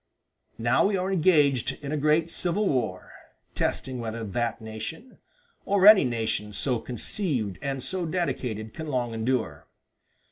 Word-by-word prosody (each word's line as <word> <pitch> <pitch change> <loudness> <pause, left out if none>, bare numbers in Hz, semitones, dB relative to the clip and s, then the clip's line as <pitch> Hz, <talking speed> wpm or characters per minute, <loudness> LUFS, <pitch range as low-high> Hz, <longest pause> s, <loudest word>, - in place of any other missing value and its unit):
"Now 120 +9 +3
we 200 -1 0
are 185 +1 -1
engaged 150 - +3
in 140 - -4
a - - 0
great 155 +3 +2
civil 185 +5 0
war, 115 - -2 0.4
testing 130 -1 -2
whether 115 0 -4
that 115 +2 -2
nation, 110 - -8 0.4
or 200 -1 +2
any 210 -1 +9
nation 110 -3 -2
so 125 +4 0
conceived 120 - -3
and 135 -2 -3
so 185 -3 -2
dedicated, 125 - -3
can 160 - -6
long 125 -5 -1
endure. 110 - -2
130 Hz, 140 wpm, -26 LUFS, 110-165 Hz, 0.4 s, any